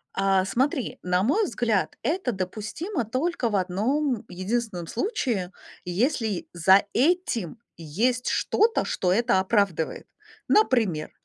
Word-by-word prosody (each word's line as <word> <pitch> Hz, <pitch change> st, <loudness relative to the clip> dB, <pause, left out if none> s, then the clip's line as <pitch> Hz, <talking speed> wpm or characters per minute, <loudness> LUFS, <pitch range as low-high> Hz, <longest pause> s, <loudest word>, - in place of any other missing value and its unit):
А. 195 Hz, -1 st, +2 dB
Смотри, 260 Hz, +3 st, -1 dB
на 180 Hz, +1 st, +1 dB
мой 385 Hz, -, +2 dB
взгляд, 240 Hz, -, -1 dB
это 315 Hz, -6 st, -1 dB
допустимо 220 Hz, -, -4 dB
только 255 Hz, +1 st, -1 dB
в 205 Hz, -, -1 dB
одном 220 Hz, +8 st, 0 dB
единственном 185 Hz, -1 st, -3 dB
случае: 225 Hz, -, -2 dB, 0.3 s
если 215 Hz, -, -1 dB
за 190 Hz, +3 st, +5 dB
этим 265 Hz, -, 0 dB, 0.2 s
есть 225 Hz, +11 st, -1 dB
что-то, 450 Hz, +2 st, +1 dB
что 180 Hz, -1 st, 0 dB
это 230 Hz, -1 st, +3 dB
оправдывает. 190 Hz, -5 st, 0 dB, 0.4 s
Например, 225 Hz, -, +2 dB
220 Hz, 110 wpm, -25 LUFS, 185-260 Hz, 0.4 s, за